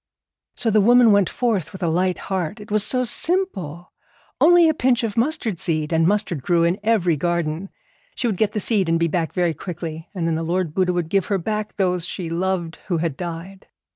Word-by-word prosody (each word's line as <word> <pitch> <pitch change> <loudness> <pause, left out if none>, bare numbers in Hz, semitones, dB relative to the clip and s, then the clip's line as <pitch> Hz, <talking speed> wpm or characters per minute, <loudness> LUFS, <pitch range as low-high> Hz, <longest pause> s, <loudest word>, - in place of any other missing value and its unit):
So 225 - 0
the 215 0 +4
woman 240 +1 +6
went 200 -3 +3
forth 205 -10 -1
with 190 - -8
a - - +1
light 180 +3 +1
heart. 190 +2 -3
It 210 0 -11
was 210 -1 +2
so 255 +3 +1
simple, 230 - -2 0.5
only 345 0 +6
a 315 - +3
pinch 255 -4 +1
of 220 -3 -2
mustard 230 - -1
seed, 155 -1 -1
and 165 0 +3
mustard 200 -6 0
grew 170 +4 +2
in 170 +4 +1
every 205 -6 +2
garden. 170 +2 -2 0.5
She - - -3
would 215 -5 0
get 210 0 +1
the 215 - -1
seed 200 -5 0
and 165 0 +2
be 170 - +2
back 165 0 -1
very 175 -3 0
quickly, 165 0 -7
and 175 -3 -2
then 165 - +1
the 160 - -1
Lord 170 -1 -1
Buddha 185 0 +1
would 175 -2 -2
give 195 0 +1
her 200 - +1
back 210 +3 -3
those 180 -3 0
she 170 -4 -5
loved 175 -1 -2
who 175 - 0
had 160 -3 -2
died. 175 +3 -7
185 Hz, 215 wpm, -22 LUFS, 165-215 Hz, 0.5 s, woman